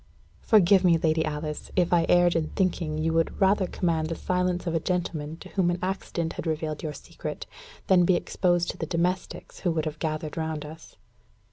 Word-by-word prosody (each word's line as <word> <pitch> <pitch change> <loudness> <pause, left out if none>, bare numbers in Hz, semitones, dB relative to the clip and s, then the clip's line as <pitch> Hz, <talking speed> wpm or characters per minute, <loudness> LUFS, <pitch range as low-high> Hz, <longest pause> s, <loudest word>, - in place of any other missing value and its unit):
"Forgive 195 -3 +5
me, 170 -2 +5
Lady 160 -1 +1
Alice, 150 0 -4
if 180 -1 +2
I 170 -1 +3
erred 175 -1 +5
in 160 -2 +1
thinking 170 -5 0
you 160 +1 0
would 165 0 0
rather 195 -1 +3
command 165 -4 -1
the 165 - -2
silence 180 0 -1
of 170 - -1
a 165 - +2
gentleman 165 -3 -2
to - - -12
whom 185 -3 +1
an 175 - 0
accident 180 -3 -2
had - - -5
revealed 155 -1 -2
your 155 - -3
secret, - - -7 0.4
than 185 -2 +5
be 180 +1 +4
exposed 175 0 +1
to - - -14
the - - -4
domestics 180 +2 -2
who 180 - 0
would 160 -1 -1
have 155 0 -4
gathered 155 0 -3
round 160 -2 -3
us." 160 +2 -12
170 Hz, 200 wpm, -26 LUFS, 155-180 Hz, 0.4 s, Forgive